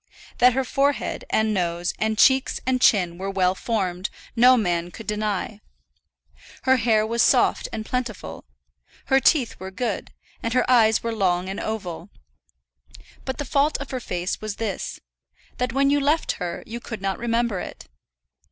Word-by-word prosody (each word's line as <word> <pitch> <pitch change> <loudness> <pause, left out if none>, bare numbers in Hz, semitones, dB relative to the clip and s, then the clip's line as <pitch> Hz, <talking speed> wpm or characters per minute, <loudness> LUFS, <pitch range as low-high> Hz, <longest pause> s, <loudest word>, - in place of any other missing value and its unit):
That 250 0 +6
her 265 +2 +1
forehead, 275 +2 0
and 220 0 +1
nose, 175 -2 -1
and 220 0 0
cheeks, 265 +3 +4
and 255 -1 +1
chin 180 -7 +3
were 195 +1 -3
well 185 -2 +2
formed, 190 -3 -2 0.3
no 250 +2 +6
man 175 -5 0
could 220 +5 -10
deny. 210 0 -2 1.0
Her 260 0 +4
hair 220 -2 +2
was 230 +1 0
soft - - +3
and 220 -1 -5
plentiful. 220 - -4 0.6
Her 270 - +4
teeth 270 -2 +2
were 190 +1 -6
good, 215 +2 -3 0.3
and 230 - -2
her 255 - +2
eyes 225 -3 +4
were 230 0 -2
long 185 -3 0
and 195 - -4
oval. 190 -7 -5 1.2
But 265 - -3
the 290 - -4
fault 285 +3 +2
of 280 - -7
her 260 - -2
face 180 -5 -3
was 215 -2 -4
this, 220 -3 -4 0.6
that 250 -1 0
when 275 +2 +2
you 290 - +3
left 295 +3 +1
her 175 -1 -4
you 235 +2 -6
could 225 -4 -8
not 195 -1 -1
remember 235 -3 0
it. - - -8
220 Hz, 165 wpm, -23 LUFS, 190-250 Hz, 1.2 s, That